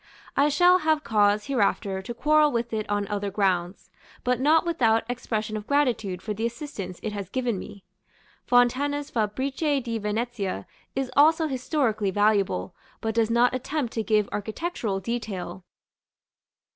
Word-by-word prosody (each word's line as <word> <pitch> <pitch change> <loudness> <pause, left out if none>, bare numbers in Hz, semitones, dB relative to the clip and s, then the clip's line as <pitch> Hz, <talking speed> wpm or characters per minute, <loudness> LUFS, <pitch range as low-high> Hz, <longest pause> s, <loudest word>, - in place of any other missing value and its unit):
I 285 +2 +4
shall 355 +5 +5
have 310 -2 +1
cause 210 -1 +2
hereafter 200 -6 0
to 215 +5 -6
quarrel 300 +3 +4
with 235 -1 -2
it 215 -1 -2
on 205 -1 0
other 205 0 -2
grounds, 185 -2 -1 0.3
but 250 -1 +1
not 310 +5 +4
without 230 -10 +2
expression 220 -3 -3
of 210 0 -5
gratitude 230 -10 0
for 215 - -3
the 215 +2 -5
assistance 235 - -5
it 215 - -3
has 200 -3 -5
given 245 -5 -1
me. 200 +1 -10 0.6
Fontana's 280 +4 +2
"Fabbriche 265 +7 0
di 230 -2 -3
Venezia" 210 - -3 0.3
is 265 -1 -2
also 315 +3 +5
historically 255 -7 0
valuable, 200 - +1 0.3
but 220 0 -2
does 225 -1 +2
not 235 +2 +3
attempt 265 0 -2
to 225 - -1
give 215 -2 +2
architectural 220 - -3
detail. 195 -4 -4
230 Hz, 145 wpm, -26 LUFS, 205-275 Hz, 0.6 s, shall